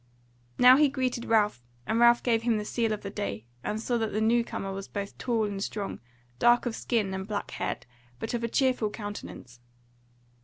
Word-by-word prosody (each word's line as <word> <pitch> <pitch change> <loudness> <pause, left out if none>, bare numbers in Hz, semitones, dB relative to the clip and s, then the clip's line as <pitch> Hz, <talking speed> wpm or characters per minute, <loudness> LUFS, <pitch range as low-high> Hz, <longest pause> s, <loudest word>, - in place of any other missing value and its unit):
Now 250 +1 +8
he 295 -1 +5
greeted 255 -3 -2
Ralph, 210 - +2 0.2
and 225 - 0
Ralph 235 0 +6
gave 230 -2 +2
him 230 -1 +1
the 210 - -3
sele 230 0 0
of 210 - -2
the 200 - -5
day, 115 - -4 0.2
and 215 +1 -2
saw 240 +1 -1
that 220 -1 -1
the 215 - -1
new 230 +2 +3
comer 195 -4 -5
was 195 0 -6
both 200 -1 -5
tall 230 -3 0
and 200 -1 -3
strong, 205 -2 -4 0.4
dark 240 - +5
of 235 -2 -2
skin 210 -5 -1
and 190 0 -4
black 210 -1 -3
haired, - - -3 0.3
but - - -4
of 235 -1 -2
a - - +1
cheerful 250 -3 +1
countenance. 205 - -8
220 Hz, 200 wpm, -28 LUFS, 205-240 Hz, 0.4 s, Now